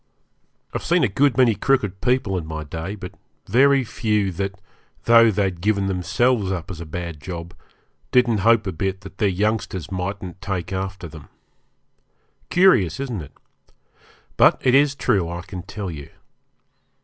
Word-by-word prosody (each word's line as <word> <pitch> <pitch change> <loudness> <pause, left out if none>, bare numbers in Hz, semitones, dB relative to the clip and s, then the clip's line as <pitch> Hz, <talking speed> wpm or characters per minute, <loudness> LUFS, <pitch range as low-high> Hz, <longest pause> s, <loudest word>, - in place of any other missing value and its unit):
I've - - -3
seen - - +2
a - - +4
good 130 +5 +2
many 125 -3 +5
crooked 105 -6 0
people 125 -6 +1
in 85 -4 -4
my 80 -1 -5
day, 80 +6 -6
but 90 -3 -8 0.3
very 135 +5 +4
few 105 -4 -1
that, 95 +2 -4 0.4
though 115 0 +6
they'd 95 -4 -1
given 100 0 +1
themselves 95 +3 +1
up 90 -1 -4
as 85 -3 -7
a 85 - -8
bad 85 -1 -6
job, 85 -1 -7 0.6
didn't 120 -4 +3
hope 115 +2 +4
a 95 - -2
bit 95 +3 -3
that 100 - -13
their 105 -3 +3
youngsters 100 -2 -2
mightn't 95 -1 -5
take 95 -2 -4
after 95 -1 -4
them. 80 -2 -13 1.2
Curious, 130 - +4
isn't 125 -9 -3
it? 75 - -12 1.0
But - - +5
it 125 - +4
is 140 +1 +4
true, 100 -11 +1
I 85 0 -5
can 95 -1 -7
tell 100 0 -6
you. 70 -3 -9
95 Hz, 160 wpm, -22 LUFS, 90-115 Hz, 1.2 s, though